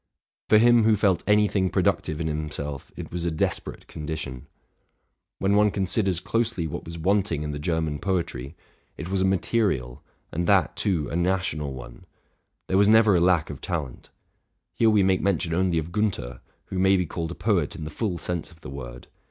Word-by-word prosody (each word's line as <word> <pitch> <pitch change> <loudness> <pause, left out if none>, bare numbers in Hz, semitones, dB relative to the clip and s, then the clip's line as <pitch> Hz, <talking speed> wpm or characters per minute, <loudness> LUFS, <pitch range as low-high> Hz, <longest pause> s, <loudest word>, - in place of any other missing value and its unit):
For 110 - +7
him 120 +1 +6
who 110 0 +4
felt 100 -3 +2
any 105 0 +4
thing 95 -2 0
productive 80 -2 0
in 85 - -2
himself 75 -2 -4
it - - -7
was 90 -1 -4
a 85 - +1
desperate 80 -1 -2
condition. 75 -4 -6 0.9
When 100 +1 +1
one 105 0 +5
considers 95 -2 +1
closely 115 -4 -1
what 80 - -5
was 85 0 -7
wanting 95 -2 +1
in 75 - -3
the 75 - -5
Ger 80 +1 0
man 75 -2 -3
poetry, 85 -7 -2 0.4
it 85 - -6
was 95 0 0
a - - +3
material, 95 - 0 0.3
and 85 +1 -2
that, 95 -6 +3
too, 85 -8 0
a - - -3
national 85 -5 -1
one: 60 -1 -11 0.6
there 95 - +1
was 100 - +5
never 110 -2 +6
a 85 - +3
lack 85 -4 +2
of 70 - -9
talent. 80 -9 -5 0.6
Here 115 - +3
we 105 -2 +4
make 95 -1 +2
mention 85 -4 0
only 90 0 +1
of 80 +1 -3
Giinther, 85 - -2 0.3
who 95 - -4
may 95 +1 +4
be 90 - 0
called 80 +1 -4
a 85 - -6
poet 105 -3 0
in 85 - -7
the 75 - -6
full 95 +1 -2
sense 85 -1 -4
of 80 -1 -19
the 65 - -9
word. - - -8
85 Hz, 195 wpm, -25 LUFS, 75-100 Hz, 0.9 s, For